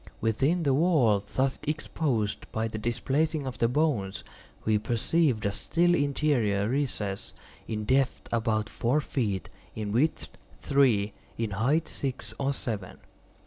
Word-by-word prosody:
Within 135 +11 +1
the 140 -3 +3
wall 130 - +3
thus 135 0 +1
exposed 145 -7 -2
by 110 +1 -1
the 110 -1 -5
displacing 135 +7 0
of 130 -2 -5
the 115 - +4
bones, 125 -8 0 0.4
we 110 -1 +3
perceived 120 +2 +1
a 100 - +2
still 175 +11 +2
interior 140 -9 +1
recess, 115 -7 -2 0.3
in 110 -1 -3
depth 130 +2 +1
about 110 -2 +1
four 125 +6 +1
feet, 110 -10 -2 0.3
in 105 -2 -3
width 140 +9 +1 0.3
three, 120 -8 +3 0.2
in 115 -2 -2
height 130 - +1
six 135 -2 -3
or 140 0 +1
seven. 110 -8 -4
125 Hz, 135 wpm, -28 LUFS, 110-145 Hz, 0.4 s, the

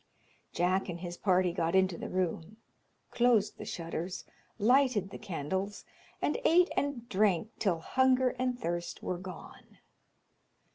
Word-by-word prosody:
Jack 185 +2 +1
and 170 -1 -5
his 175 -1 -5
party 185 -2 +2
got 170 0 0
into 190 -2 +3
the - - -6
room, 185 +2 -2 0.5
closed 235 -4 +2
the - - -6
shutters, 170 +2 -5 0.3
lighted 230 -3 +3
the - - -8
candles, 190 +4 -4 0.4
and 295 - +1
ate 350 +3 +5
and 280 -5 -2
drank 205 -1 +2
till 190 -6 +1
hunger 260 +4 +3
and 250 -1 0
thirst 175 -2 -4
were 180 - -2
gone. 185 0 -11
190 Hz, 135 wpm, -31 LUFS, 175-240 Hz, 0.5 s, ate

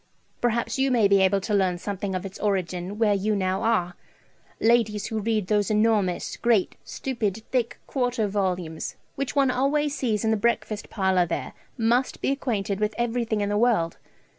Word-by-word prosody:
Perhaps 240 +2 0
you 270 0 +3
may 235 -5 +4
be 200 -1 +4
able 190 +1 +3
to 210 +2 -3
learn 190 -3 +2
something 195 +1 -4
of 185 +1 -3
its 195 - -8
origin 190 -1 -2
where 215 -2 +3
you 205 +2 0
now 190 -1 0
are. 195 -6 +1 0.7
Ladies 220 -3 +2
who 220 - -2
read 215 -1 0
those 205 +1 +1
enormous 210 -4 +1
great 230 -5 +2
stupid 225 -5 -3
thick 245 -3 0
quarto 245 -5 0
volumes 180 -5 -2 0.2
which 275 0 -3
one 275 -2 +4
always 285 +3 +1
sees 225 -6 -1
in 220 - +2
the 220 - +2
breakfast 215 -1 -1
parlour 190 -3 +2
there - - -4 0.2
must 240 +3 +1
be - - 0
acquainted 210 -8 -2
with 210 0 -1
everything 230 -2 0
in 205 - 0
the 205 0 +1
world. 215 -9 +2
215 Hz, 175 wpm, -25 LUFS, 195-235 Hz, 0.7 s, may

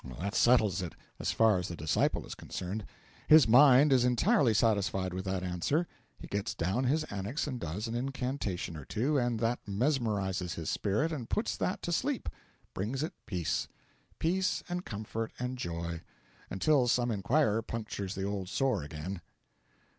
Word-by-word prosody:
That 100 +4 -3
settles 110 -8 +4
it 90 - -5 0.2
as - - -1
far 110 -4 +4
as 90 - -3
the 85 - -5
disciple 75 -1 0
is - - -7
concerned. 100 +4 -5 0.4
His 155 -4 +8
Mind 135 +3 +7
is 125 -2 +4
entirely 125 - +3
satisfied 100 -4 +1
with 95 +1 -4
that 95 -1 -2
answer; 90 - 0 0.3
he - - -10
gets 100 +2 -3
down 95 +10 0
his 155 +5 +2
Annex 100 +9 -2
and 130 -5 -4
does 100 +5 -4
an 115 - -4
incantation 125 - -3
or 75 - -7
two, 135 - 0
and 120 -2 0
that 115 +1 +1
mesmerises 100 - 0
his 80 -2 -3
spirit 110 +11 0
and 130 -8 -5
puts 220 - 0
that 185 - -2
to 175 - -2
sleep 265 - -1 0.4
brings 120 +9 -2
it 160 - -3
peace. 90 -6 -1 0.5
Peace 185 +3 0
and 180 +1 -3
comfort 110 +1 -4
and 125 +1 -4
joy, 85 -3 -4 0.5
until 130 +5 +2
some 120 0 +2
inquirer 110 +2 +2
punctures 105 -4 -5
the 95 - -3
old 100 -2 -3
sore 115 -1 +1
again. 80 +5 -6
110 Hz, 165 wpm, -31 LUFS, 95-135 Hz, 0.5 s, His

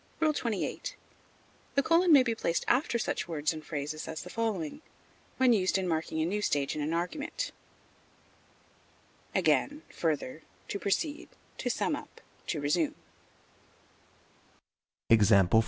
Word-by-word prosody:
XXVIII. 235 -9 -1 0.9
The 275 - +4
colon 335 +4 +4
may 280 -4 +8
be 235 -2 0
placed 170 -6 -1
after 245 -1 +2
such 230 - -2
words 155 -2 0
and 155 -1 -7
phrases 150 0 -4
as 160 - -5
the 180 - -9
following, 220 - -2 0.6
when 260 -2 +5
used 190 -3 +2
in 190 -1 -1
marking 160 -1 -1
a 160 - +2
new 205 +5 -1
stage 145 -8 0
in 155 - -2
an 150 +2 -1
argument: 275 - -2 1.8
Again, 295 +2 +2
further, 155 -2 -2 0.3
to 200 - -2
proceed, 290 - -1 0.3
to - - -1
sum - - 0
up, - - -10 0.3
to 160 - -1
resume. 150 +2 +1
185 Hz, 125 wpm, -30 LUFS, 160-250 Hz, 1.8 s, may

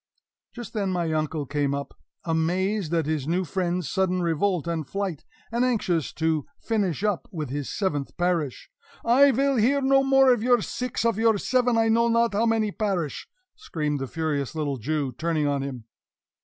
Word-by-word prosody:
Just 240 -4 -9
then 200 -4 -1
my 170 -3 -1
uncle 155 -1 -1
came 140 0 -1
up, 140 0 -5 0.3
amazed 175 +3 0
at 165 -3 +1
his 150 -3 -2
new 180 +3 +1
friend's 180 -1 -2
sudden 185 +1 0
revolt 170 +1 0
and 165 -4 -3
flight, 195 -5 -3 0.3
and 235 +2 +1
anxious 195 - 0
to 160 -3 0
finish 200 - -1
up 210 -4 0
with 155 -8 -5
his 145 -1 -3
seventh 150 -9 -2
parish. 175 -6 -1 0.3
"I 265 +4 +6
vill 275 +1 +2
hear 255 +6 +3
no 270 0 +4
more 270 -1 +5
of 240 - -2
your 245 -1 +3
six, 250 -2 -3
of 230 -2 +1
your 225 -2 +4
seven 245 +2 +1
I 225 0 +3
know 230 +1 +3
not 230 -1 +2
how 220 +3 +2
many 220 -2 +1
parish!" 190 - -2 0.3
screamed 150 - -3
the 135 - -3
furious 155 -2 -2
little 145 -3 -2
Jew, 140 +3 -2
turning 155 +3 -1
on 140 -1 0
him. 135 -4 -5
180 Hz, 180 wpm, -25 LUFS, 155-225 Hz, 0.3 s, I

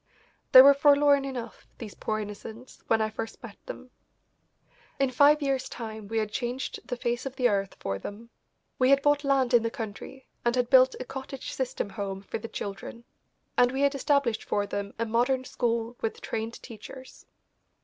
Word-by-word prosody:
They 255 - +11
were 280 +1 +8
forlorn 285 -1 +4
enough, 245 -4 -7
these 215 -4 -8
poor 215 - -3
innocents, 215 +4 -9
when 225 -1 +2
I 215 - -2
first 225 +1 -7
met 225 -4 -9
them. 255 0 -9 1.1
In 270 -1 +2
five 290 +3 +5
years' 265 -1 -1
time 220 -3 -7
we 225 +2 -3
had 215 -1 -1
changed 245 +3 -3
the 245 - -3
face 240 +2 -2
of 265 - -8
the 250 - +3
earth 195 -3 -1
for 95 0 -3
them. 225 - -9 0.5
We 255 0 +4
had 275 0 +4
bought 290 0 +3
land 270 -3 +2
in 240 - +6
the 230 - -1
country 230 +3 -8 0.2
and 240 0 +1
had 245 -1 0
built 260 0 +6
a 255 - -5
cottage 265 0 -7
system 260 -6 -3
home 195 -2 -5
for - - -5
the 230 - -7
children, 205 +3 -7 0.5
and 245 0 +4
we 265 +1 -2
had 280 0 +3
established 275 -4 +1
for 205 - -1
them 200 0 -5
a 230 - -1
modern 245 +4 +1
school 235 -2 -2
with 225 - -3
trained 225 +1 -4
teachers. 255 +4 -12
245 Hz, 185 wpm, -27 LUFS, 220-265 Hz, 1.1 s, They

